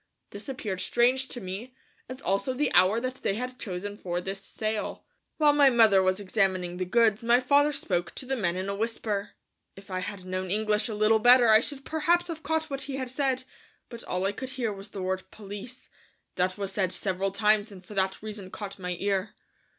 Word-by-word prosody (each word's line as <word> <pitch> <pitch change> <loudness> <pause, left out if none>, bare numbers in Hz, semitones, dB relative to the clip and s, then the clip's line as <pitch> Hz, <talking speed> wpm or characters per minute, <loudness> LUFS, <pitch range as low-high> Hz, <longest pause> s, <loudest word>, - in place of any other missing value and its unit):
This 205 +6 -7
appeared 210 -8 -3
strange 250 +6 +2
to 245 - -7
me, 210 +6 -7 0.3
as 255 +1 -8
also 200 +7 0
the 290 +1 0
hour 195 +5 +5
that 255 +1 -4
they 195 - 0
had 250 +2 -5
chosen 200 +1 -5
for 175 -1 -2
this 195 +2 -5
sale. 215 -1 -4 0.3
While 300 -2 +5
my 285 -2 +6
mother 220 -6 +6
was 185 +1 +1
examining 185 -3 0
the 185 - -1
goods 220 +2 +3
my 235 +1 +5
father 285 +3 +4
spoke 180 -11 -2
to - - -6
the 265 +1 -1
men 180 -8 0
in 185 +1 -3
a 200 - -1
whisper. 210 -1 -2 0.4
If 195 0 -13
I 185 - -1
had 190 0 -6
known 185 0 -3
English 215 +2 +1
a 215 - -3
little 215 +1 +4
better 245 +1 +7
I 215 0 +8
should 270 +3 -4
perhaps 345 +3 +1
have 320 -2 -5
caught 320 +1 -1
what 275 -2 -4
he 275 0 -4
said, 260 0 -1 0.5
but 235 -2 -9
all 180 +1 -1
I 195 - +2
could 255 +5 -6
hear 250 -5 -2
was 195 +1 -10
the 195 -3 -6
word 185 0 -2
"police," 210 +5 -9 0.4
that 185 +1 0
was 200 -1 -3
said 190 -3 0
several 190 0 -1
times 210 +2 +2
and 185 -2 -12
for 210 - -10
that 190 0 -1
reason 210 -3 -7
caught 200 0 -7
my 180 -1 -3
ear. 200 0 -1
210 Hz, 210 wpm, -28 LUFS, 190-255 Hz, 0.5 s, I